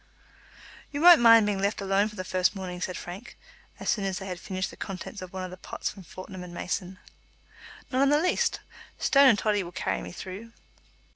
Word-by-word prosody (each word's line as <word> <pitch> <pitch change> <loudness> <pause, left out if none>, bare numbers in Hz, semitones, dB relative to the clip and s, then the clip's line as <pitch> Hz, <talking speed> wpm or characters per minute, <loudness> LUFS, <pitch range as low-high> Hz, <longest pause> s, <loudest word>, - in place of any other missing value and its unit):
"You 285 - -3
won't 345 -3 +8
mind 230 -2 +8
being 200 -2 -1
left 200 +2 0
alone 195 +1 +2
for 210 - -13
the 185 - -4
first 185 +1 +1
morning?" 180 -2 -6
said 185 0 -3
Frank, 190 +7 -9 0.4
as - - -7
soon 205 - +1
as 190 -1 -2
they 195 - -6
had 180 -2 -5
finished 190 0 -4
the - - -12
contents 195 +1 -7
of 185 -1 -8
one 190 -1 -5
of 185 - -6
the 185 - -9
pots - - -5
from 195 - -12
Fortnum 185 +1 -9
and 175 -1 -10
Mason. 180 +1 -4 0.9
"Not 260 0 +1
in 275 - +4
the 295 - +4
least. 360 +3 +1 0.4
Stone 280 -1 +5
and 225 - +4
Toddy 210 -1 +1
will 175 -2 -7
carry - - -2
me - - -8
through." 195 +6 -8
195 Hz, 215 wpm, -27 LUFS, 185-220 Hz, 0.9 s, won't